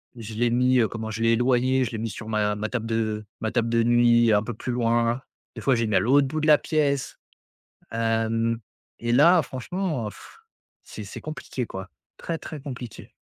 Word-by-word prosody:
je 115 -2 -8
l'ai 120 +2 +1
mis, 125 +2 +3
heu, 115 - +3
comment 110 -1 -5
je 110 +1 -5
l'ai 115 0 +4
éloigné. 130 +2 +2
Je 120 - -3
l'ai 110 - -4
mis 115 +1 -3
sur 105 +1 -8
ma 105 -1 0
ma 105 +1 -3
table 115 -2 -3
de 110 -1 -1
ma 110 - -2
table 115 -1 0
de 115 0 +2
nuit, 120 -1 +4
un 105 - +4
peu 120 - -5
plus 125 - -4
loin. 120 0 +1 0.3
Des - - -7
fois, 135 - +3
j'ai 115 0 0
mis 105 -2 0
à - - +6
l'autre 140 +4 +4
bout 155 +4 -3
de 155 - 0
la 150 -1 +8
pièce, 145 -4 -1 0.7
hem, 115 0 0 0.4
et 120 0 -2
là, 165 +8 +6
franchement, 145 - -3
pff! - - -15 0.5
C'est 105 - -8
c'est 100 - -8
compliqué 155 -4 -5
quoi, 95 -1 -7 0.3
très, 165 - -3
très 150 -1 -8
compliqué. 125 -5 -8
120 Hz, 210 wpm, -25 LUFS, 110-130 Hz, 0.7 s, la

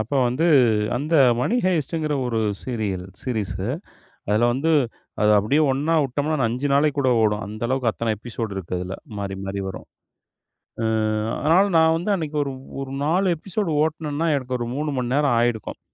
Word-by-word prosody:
அப்ப 110 +5 -5 0.2
வந்து, 150 +8 0 0.5
அந்த 150 +5 -2 0.3
மணி 225 - +1
ஹைஸ்ட்ங்கிற 160 -3 0
ஒரு 115 -2 -1 0.2
சீரியல் 105 -7 -3 0.2
சீரிஸ்ஸு 100 -5 -3 0.6
அதுல 110 +3 +3
வந்து, 145 +6 +1 0.5
அது 105 - +4
அப்படியே 110 +10 +2
ஒண்ணா 150 +5 0
வுட்டோம்னா, 145 +4 -1
5 125 +5 -2
நாளைக்கு 145 0 +2
கூட 130 -2 +2
ஓடும். 105 -1 +1
அந்த 110 +2 -8
அளவுக்கு 130 -2 +1
அத்தனை 115 -1 -1
எபிசோடு 110 -2 -5
இருக்கு, 90 -3 -7
அதுல. 90 +2 -5 0.2
மாறி, 100 -1 -4
மாறி 100 0 -3
வரும். 95 - -8 1.0
ம். 110 0 0
அதனால 165 +6 +4
நான் 160 0 +5
வந்து 175 +5 -2
அன்னைக்கு 155 -4 -4 0.4
ஒரு 135 -1 -6
4 180 +5 +2
எபிசோடு 190 +2 -3
ஓட்னேன்னா, 155 0 -2
எனக்கு 130 -2 -3
ஒரு 120 - -3
3 150 +2 -2
மணி 125 0 -1
நேரம் 145 -4 +3
ஆயிருக்கும். 120 -2 -1
130 Hz, 160 wpm, -23 LUFS, 110-155 Hz, 1.0 s, நான்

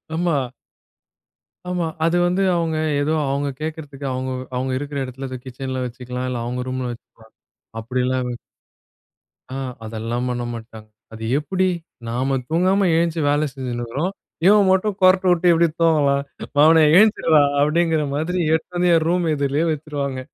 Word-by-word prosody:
ஆமா. 170 -2 +1 1.3
ஆமா. 180 -2 -1 0.2
அது 170 +1 +2
வந்து 180 +2 +1
அவுங்க 165 -2 0 0.2
ஏதோ 155 +2 0 0.2
அவங்க 140 +1 -1
கேக்கறதுக்கு, 150 -3 -6
அவுங்க 130 0 -3 0.3
அவுங்க 130 +1 -2
இருக்கற 145 0 -5
எடத்துல 130 +1 -7 0.2
கிச்சன்ல 130 0 -4
வச்சுக்கலாம். 125 +1 -5
இல்ல 120 -2 -3
அவங்க 125 +1 -3
ரூம்ல 130 -1 -3
வச்சுக்கலாம். 115 -1 -18 0.5
அப்டில்லாம் 125 +2 -1 1.3
ஆ - - -3 0.3
அதெல்லாம் 115 +2 -3
பண்ண 120 -1 -2
மாட்டாங்க. 110 -1 -10 0.3
அது 110 0 -6
எப்டி? 185 +5 0 0.4
"நாம 130 +3 0
தூங்காம 185 +4 +2
எழுந்த்ச்சி 165 -1 +1
வேல 150 +1 +2
செஞ்சுனு 125 -3 -4
இருக்கறோம். 140 +10 -2 0.3
இவன் 205 0 +6
மட்டும் 190 +1 +1
கொரட்ட 185 +1 +5
விட்டு 175 0 +4
எப்டி 170 0 +4
தூங்கலாம்? 145 -4 +3 0.3
"மவனே 160 +2 +6
எழுந்திர்றா" 180 -7 +5 0.2
அப்படிங்கிற 160 +1 +2
மாதிரி 170 +5 -1
எடுத்து 160 +2 -2
வந்து 175 0 +3
என் 160 -1 +2
ரூம் 175 +1 +1
எதிர்லயே 145 +2 0
வச்சுருவாங்க. 145 -3 -3
145 Hz, 140 wpm, -21 LUFS, 130-170 Hz, 1.3 s, இவன்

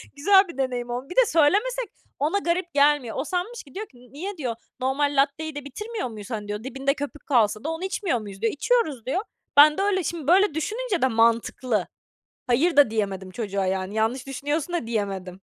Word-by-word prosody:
Güzel 385 +7 +5
bir 340 - -10
deneyim 250 -2 -2
oldu." 250 +3 -4
Bir 360 - -7
de - - +6
söylemesek 420 +8 +2 0.3
ona 310 +8 +1
garip 345 -2 -1
gelmiyor. 285 -4 +3
O 265 - 0
sanmış 370 +8 -3
ki, 275 - -18
diyor 430 +2 -4
ki, 250 - -22 0.2
"Niye?" 370 +6 -5
diyor. 245 -6 -3 0.2
"Normal 280 +3 0
latteyi 290 +2 +1
de 290 - -6
bitirmiyor 420 - -5
muyuz, 215 +2 -9
hani?" 210 -2 -4
diyor. 210 +2 -4
"Dibinde 270 +1 -1
köpük 290 +1 -7
kalsa 220 -5 +2
da 315 - -2
onu 325 +2 -4
içmiyor 380 - -1
muyuz?" 200 -2 -9
diyor. 225 - +1
"İçiyoruz." 310 - 0
diyor. 280 +9 0 0.4
"Ben 300 +1 +8
de - - 0
öyle." 390 -3 +1
Şimdi 315 -2 -4
böyle 370 -1 +5
düşününce 420 +4 -2
de 260 - +4
mantıklı. 230 -2 +1 0.6
Hayır 290 +6 +2
da 285 -5 +7
diyemedim 195 -3 -2
çocuğa 200 -3 -2
yani, 190 +2 -2
"Yanlış 240 +5 0
düşünüyorsun." 290 +5 -2
da 240 -10 -2
diyemedim. 195 -4 -3
280 Hz, 195 wpm, -25 LUFS, 230-345 Hz, 0.6 s, Ben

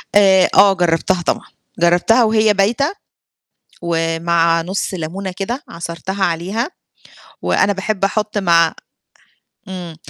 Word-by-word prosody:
آآ 190 -2 +5
آه 195 0 +6
جرّبتها 175 0 0
طبعًا، - - -2 0.3
جرّبتها 175 +8 +3
وهي 215 -1 +3
بايتة، 235 - +1 0.9
ومع 165 0 +1
نُص 190 +3 -3
لمونة 185 +3 -5
كده 235 +8 -4
عصرتها 170 +4 -4
عليها 190 - -2 0.7
وأنا 205 - +2
باحب 195 0 -2
أحُط 210 +1 -1
مع 170 -4 +3 0.9
إمم. 180 -4 -7
190 Hz, 105 wpm, -17 LUFS, 170-205 Hz, 0.9 s, آه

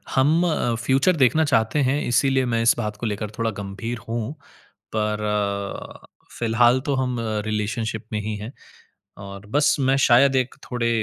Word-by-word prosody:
हम 155 +6 +3
अ, 120 -7 0
फ्यूचर 135 +8 +3
देखना 155 +3 +3
चाहते 115 +1 +1
हैं 145 +2 0
इसलिए 130 +1 +2
मैं 115 -1 0
इस 115 - +5
बात 105 -3 -3
को 120 - -5
लेकर 105 -1 -3
थोड़ा 115 -1 0
गंभीर 100 +5 -5
हूँ। 115 +3 -3 0.6
पर 105 0 -1
अ, 100 -1 -3 0.3
फिलहाल 120 +2 +3
तो 140 -2 0
हम 130 -1 -1 0.3
रिलेशनशिप 110 +1 -3
में 105 - 0
ही 105 +1 -4
हैं 105 +4 -7 0.7
और 100 +1 -9
बस 145 0 +4
मैं 135 0 +2
शायद 135 +3 +5
एक 130 -1 0 0.2
थोड़े 120 -1 0
120 Hz, 165 wpm, -23 LUFS, 105-130 Hz, 0.7 s, इस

